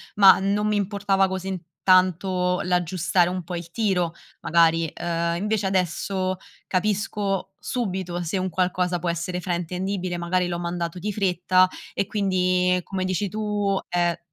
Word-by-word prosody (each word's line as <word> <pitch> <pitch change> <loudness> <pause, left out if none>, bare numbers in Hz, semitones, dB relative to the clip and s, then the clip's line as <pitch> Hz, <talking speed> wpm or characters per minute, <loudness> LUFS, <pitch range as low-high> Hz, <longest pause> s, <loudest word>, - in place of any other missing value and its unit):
ma 195 -2 +8
non 200 +2 +1
mi 210 - +1
importava 200 -1 +1
così 190 0 -4
n 185 - -3 0.3
tanto 185 0 +3
l'aggiustare 180 0 +2
un 180 -1 -3
po' 175 +1 -5
il 170 -1 -7
tiro, 180 -5 0 0.3
magari, 165 -1 +3
ehm, 170 0 -1
invece 210 +1 -1
adesso 185 0 0 0.3
capisco 195 0 -1
subito 185 -7 -3
se 170 +3 -2
un 185 0 -1
qualcosa 180 0 0
può 175 - -2
essere 170 +2 -2
fraintendibile, 180 +1 -2
magari 175 +1 0
l'ho 175 -1 -2
mandato 170 0 -3
di 210 +3 -3
fretta, 185 -1 +3 0.3
e 200 - 0
quindi, 185 -3 +1
come 190 0 -3
dici 185 +2 -1
tu, 205 -1 -1
è 175 -1 0
185 Hz, 145 wpm, -24 LUFS, 175-195 Hz, 0.3 s, ma